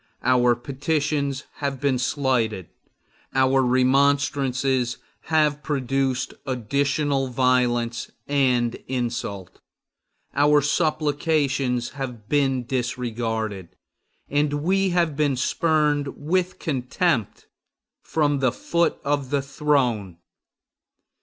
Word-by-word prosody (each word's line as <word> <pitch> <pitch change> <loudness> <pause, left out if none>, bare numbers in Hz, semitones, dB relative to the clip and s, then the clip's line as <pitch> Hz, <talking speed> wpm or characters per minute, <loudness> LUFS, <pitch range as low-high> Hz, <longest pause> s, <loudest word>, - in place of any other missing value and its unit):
Our 125 -1 +4
petitions 140 +1 -1
have 140 -2 -3
been 135 -2 +1
slighted; 120 - 0 0.7
our 130 0 +4
remonstrances 130 -1 +2 0.3
have 150 -2 +2
produced 135 -2 -1
additional 140 +3 0
violence 125 -2 +1 0.2
and 125 -4 +2
insult; 120 -7 -4 0.7
our 145 +1 +4
supplications 145 -4 0
have 125 -6 -7
been 135 -4 +1
disregarded; 115 -6 -3 0.5
and 145 0 0
we 195 +2 +2
have 170 -4 +1
been 145 -2 +1
spurned 150 +1 +1
with 180 +5 -1
contempt 130 - -1 0.6
from 145 -3 0
the 130 -2 +2
foot 170 +6 0
of 140 -2 -1
the 140 -1 0
throne! 130 - 0
135 Hz, 90 wpm, -24 LUFS, 125-145 Hz, 0.7 s, Our